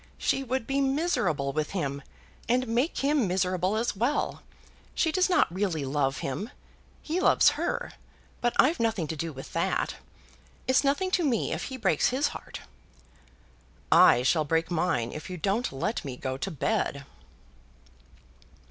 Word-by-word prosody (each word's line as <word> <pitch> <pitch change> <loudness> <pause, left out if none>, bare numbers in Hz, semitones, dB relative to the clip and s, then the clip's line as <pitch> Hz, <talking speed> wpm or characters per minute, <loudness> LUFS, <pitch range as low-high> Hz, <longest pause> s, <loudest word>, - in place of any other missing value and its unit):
She 270 - 0
would 260 -1 -2
be 275 +2 0
miserable 265 - 0
with 155 +3 -2
him, 140 -7 -2 0.5
and 250 +1 +2
make 245 +8 0
him 285 -6 +2
miserable 185 +1 0
as 230 0 -1
well. 240 +9 -1 0.5
She 320 - +2
does 370 +2 +2
not 355 - +3
really 180 -7 -1
love 135 0 0
him. 160 - -3 0.5
He 330 +3 -1
loves - - +5
her, - - -3 0.5
but 240 0 0
I've 310 +6 +4
nothing 225 -7 0
to 160 - -2
do 165 +2 -4
with 135 -2 -10
that. - - -1 0.7
It's 260 +2 +4
nothing 290 +7 +1
to 360 - +2
me 250 -8 0
if - - -3
he 260 - -6
breaks 190 - +2
his 275 +4 +1
heart." - - -9 1.3
"I 120 - +7
shall 155 +4 +3
break 165 +3 0
mine 160 -9 0
if 155 - -7
you 180 - -5
don't 205 +8 0
let 175 - -2
me 130 -3 -6
go 130 0 -3
to 135 +9 -4
bed." 140 -3 -1
195 Hz, 155 wpm, -27 LUFS, -, 1.3 s, I